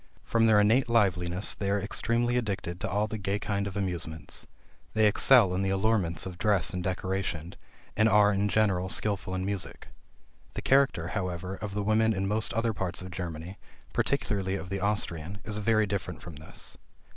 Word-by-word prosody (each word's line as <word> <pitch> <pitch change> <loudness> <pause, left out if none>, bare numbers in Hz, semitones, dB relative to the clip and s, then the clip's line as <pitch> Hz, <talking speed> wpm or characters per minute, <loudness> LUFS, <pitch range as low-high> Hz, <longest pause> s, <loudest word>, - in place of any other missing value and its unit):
From 115 0 +3
their 110 -2 +6
innate 115 +5 +3
liveliness, 95 -4 +2
they 100 - -3
are 100 +1 +2
extremely 115 +4 0
addicted 100 -7 -2
to - - -3
all 105 +2 +1
the 110 0 -5
gay 100 0 -1
kind 100 -1 -2
of 100 0 -5
amusements. 80 -5 -4 0.5
They 110 0 +4
excel 105 -1 +6
in 95 - 0
the 95 - 0
allurements 95 -4 +1
of 90 -1 -7
dress 100 -7 +2
and 90 -1 -3
decoration, 95 -3 -2 0.4
and 110 +1 +4
are 105 0 +5
in 100 +1 +1
general 95 -4 +2
skilful 100 -2 -1
in 95 0 -2
music. 100 -1 -4 0.7
The - - -4
character, 135 -11 +3
however, 90 -2 -3
of 100 0 -6
the 105 - -1
women 110 +2 +3
in 95 +1 -1
most 105 +1 0
other 115 0 +1
parts 95 -2 -3
of 95 - -8
Germany, 85 +1 -6 0.3
particularly 95 -2 0
of 95 -2 -6
the 100 0 -2
Austrian, 100 -3 -2
is 105 0 -3
very 110 +1 +3
different 100 +3 -4
from 85 -6 -9
this. 80 +2 -6
100 Hz, 180 wpm, -29 LUFS, 90-105 Hz, 0.7 s, their